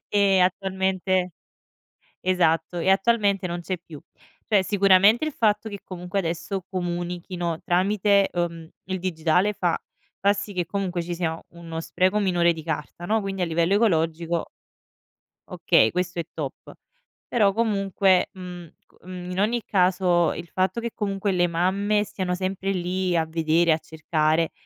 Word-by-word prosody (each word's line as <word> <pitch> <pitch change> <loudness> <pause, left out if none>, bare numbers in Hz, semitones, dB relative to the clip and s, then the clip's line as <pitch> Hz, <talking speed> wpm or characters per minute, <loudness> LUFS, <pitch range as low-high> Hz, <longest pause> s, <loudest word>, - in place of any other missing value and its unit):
e 200 -2 +3
attualmente 185 0 0 0.9
esatto 175 -1 +1
e 170 - -1
attualmente 200 -1 +2
non 175 0 -4
c'è 185 +2 -3
più. 160 -4 -12 0.5
Cioè 205 -3 +4
sicuramente 200 +5 +4
il 310 - -3
fatto 215 -3 +1
che 200 -2 -7
comunque 180 +1 -3
adesso 175 +2 -3
comunichino 175 -1 -3
tramite, 200 +2 +2
uhm, 170 -2 -3 0.2
il 190 -1 -3
digitale 180 +2 +1
fa 175 -4 0 0.5
fa 200 +1 +5
sì 205 0 -6
che 180 -1 0
comunque 180 0 -2
ci 175 +1 -4
sia 165 -2 -2
uno 165 -1 -7
spreco 185 +4 +1
minore 175 -4 +2
di 160 - -8
carta 155 +1 -5
no, 215 +4 +1
quindi 195 -2 -3
a - - +4
livello 170 +2 +1
ecologico 170 -5 +1 1.0
okay, 110 - +3
questo 180 0 -2
è - - -4
top. 145 -4 -7 0.6
Però, 210 -4 +3
comunque, 195 -3 +2
mhmm, 180 -2 -9 0.2
c - - -32
mhmm, 180 0 -7
in 185 - -2
ogni 230 +3 +1
caso 180 -2 +2
il 170 - -8
fatto 185 +4 -1
che 235 0 -3
comunque 200 -1 -1
le 175 -1 +3
mamme 200 +5 +1
siano 185 -3 -3
sempre 190 +1 -2
lì 180 0 -1
a 160 -1 +1
vedere, 165 +1 +2
a 155 - +2
cercare 160 0 0
180 Hz, 150 wpm, -24 LUFS, 170-195 Hz, 1.0 s, fa